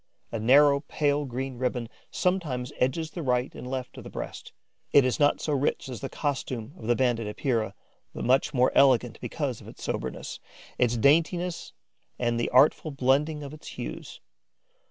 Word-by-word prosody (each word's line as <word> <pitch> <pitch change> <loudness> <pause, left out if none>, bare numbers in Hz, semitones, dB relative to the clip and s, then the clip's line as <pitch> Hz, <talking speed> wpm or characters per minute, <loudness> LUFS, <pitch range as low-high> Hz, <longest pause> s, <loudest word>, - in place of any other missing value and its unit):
A 115 - -2
narrow 140 +5 +6
pale 145 0 0
green 130 0 -5
ribbon 125 -2 -1 0.2
sometimes 150 -9 -1
edges 155 +5 0
the 175 - -5
right 125 -2 0
and - - -8
left 130 -1 -5
of - - -10
the - - -9
breast. - - -7 0.4
It 140 -2 +6
is 130 - 0
not 145 -1 +4
so 150 - -1
rich 140 0 0
as 125 - -6
the 135 - -4
costume 135 -4 -3
of 140 - -9
the 120 - +4
Banded 120 -4 +1
Epeira, 110 -2 -1 0.4
but - - -5
much 130 +2 +3
more 130 -3 +3
elegant 130 -4 +4
because - - -3
of - - -13
its - - -11
soberness, - - -4 0.4
its 120 -1 +2
daintiness 165 - +2 0.4
and 120 -1 0
the 120 - 0
artful 140 +4 +4
blending 145 +3 +1
of 140 +1 -7
its 155 - -12
hues. - - -7
130 Hz, 175 wpm, -27 LUFS, 125-145 Hz, 0.4 s, narrow